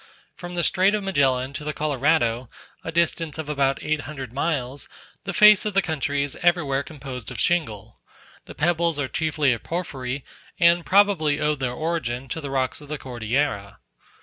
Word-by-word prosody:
From 175 -2 -8
the 175 - 0
Strait 190 +5 +3
of 210 - -3
Magellan 135 -8 +1
to 150 - -5
the 150 0 -3
Colorado, 135 -5 +1 0.3
a 160 - -4
distance 165 -1 0
of 160 -2 -5
about 140 -2 +1
eight 155 -1 0
hundred 135 -5 -7
miles, 140 -2 -2 0.4
the 195 - -2
face 210 +1 +7
of 210 -3 -2
the 195 - +5
country 145 -2 -1
is 140 - -4
everywhere 165 -6 +2
composed 135 -5 -8
of - - -7
shingle: 145 - -1 0.5
the - - -11
pebbles 170 0 +1
are 145 -2 -1
chiefly 155 -3 +1
of 115 - -5
porphyry, 135 -6 -4 0.3
and 170 -1 +4
probably 185 -7 +3
owe 150 0 +2
their 135 -4 -2
origin 135 -5 -3
to 160 - -4
the 140 - -5
rocks 135 +1 -1
of 145 - -13
the 150 - -3
Cordillera. 120 -4 -2
150 Hz, 175 wpm, -24 LUFS, 135-170 Hz, 0.5 s, face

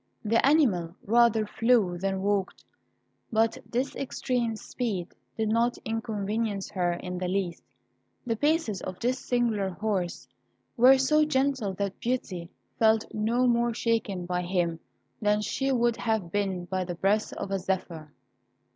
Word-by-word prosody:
The 225 +2 +3
animal 210 - +3
rather 230 0 +4
flew 225 -4 +2
than 190 +1 -2
walked. 200 -1 -1 0.7
But 225 0 +2
this 255 +3 -1
extreme 250 -4 -1
speed 210 -6 -3 0.3
did 220 -1 0
not 235 +2 +2
inconvenience 220 -2 -2
her 180 -3 0
in 180 +1 -5
the 180 - -2
least; 185 -2 -2 0.6
the 230 -2 0
paces 290 - +1
of 185 -1 -6
this 250 +2 0
singular 230 -7 0
horse 190 -2 -2 0.5
were 255 +3 +7
so 305 +4 +3
gentle 265 -8 0
that 200 0 -3
Beauty 190 -9 -3 0.3
felt 220 -1 +3
no 230 +4 +1
more 235 -1 +2
shaken 220 -6 -1
by 180 0 -1
him 175 -2 -1 0.4
than 210 0 +3
she 270 +5 -1
would 240 -2 +2
have 220 -7 -1
been 190 -3 -1
by 185 +1 -2
the 175 -1 -5
breath 200 +5 +1
of 195 - -5
a 195 - 0
zephyr. 180 -5 -3
215 Hz, 145 wpm, -28 LUFS, 185-240 Hz, 0.7 s, were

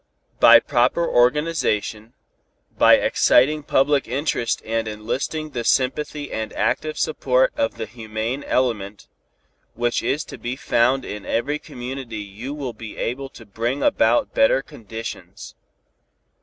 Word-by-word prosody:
By 115 0 +9
proper 130 +7 +1
organization, 125 -5 +1 0.6
by - - +7
exciting 150 +5 +3
public 145 0 +2
interest 125 -2 -1
and 115 0 -1
enlisting 125 +8 -4
the 120 -4 -3
sympathy 145 +4 0
and 110 0 -4
active 155 0 -1
support 130 -4 +1
of 115 - -1
the 115 -1 -4
humane 110 +4 -5
element, 105 -5 -1 0.7
which 120 0 0
is 150 +3 -1
to - - -10
be 120 +1 -4
found 130 0 +1
in 105 -1 -6
every 145 +6 -1
community 125 -3 -7
you 105 +6 -7
will 135 -5 -5
be 110 -1 -10
able 135 +3 -3
to 115 - -14
bring 115 +6 -3
about 295 - +2
better - - +3
conditions. 115 +1 -9
125 Hz, 130 wpm, -22 LUFS, 115-140 Hz, 0.7 s, By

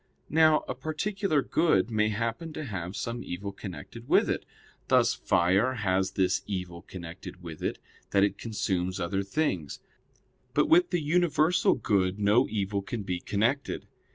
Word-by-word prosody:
Now 155 0 +5
a - - -2
particular 155 +3 -1
good 120 - +2
may 110 -1 +2
happen 115 +9 -3
to 155 - -5
have 95 -5 -5
some 120 +1 -4
evil 100 +3 -5
connected 100 +5 -9
with - - +4
it; - - -3 0.4
thus - - +4
fire 100 +9 +2
has 95 -3 0
this 95 -1 +1
evil 90 -4 -4
connected 90 +1 -9
with 80 -3 -8
it - - -2 0.3
that 100 -1 +3
it 100 0 0
consumes 95 -4 -2
other 95 +2 -1
things: 95 - -2 0.8
but - - +4
with 345 +3 +5
the 175 -3 0
universal 165 +1 +3
good 100 -5 +1
no 105 +5 +4
evil 100 -1 -1
can 105 +2 -5
be 90 -2 -2
connected. 115 +10 -1
105 Hz, 155 wpm, -28 LUFS, 95-140 Hz, 0.8 s, Now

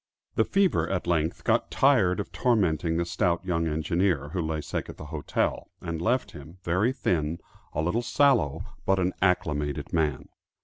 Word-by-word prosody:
The - - +2
fever 195 -2 +2
at 95 -2 -1
length 85 -2 0
got - - +2
tired 110 -9 +3
of 100 - -4
tormenting 85 - +1
the 85 - 0
stout 85 +1 0
young 85 -3 0
engineer, 80 -1 0
who 90 +3 -2
lay 80 -1 -2
sick - - -4
at - - -9
the - - -8
hotel, 75 - -1
and 85 -1 -4
left 125 +7 +1
him, 75 +5 -11
very 90 +8 +2
thin, 85 - -1 0.4
a 80 - -1
little 90 +8 +1
sallow 120 - +2 0.2
but 95 - +2
an 90 0 +1
"acclimated" 75 -6 0
man. 75 -4 0
85 Hz, 170 wpm, -27 LUFS, 80-95 Hz, 0.4 s, tired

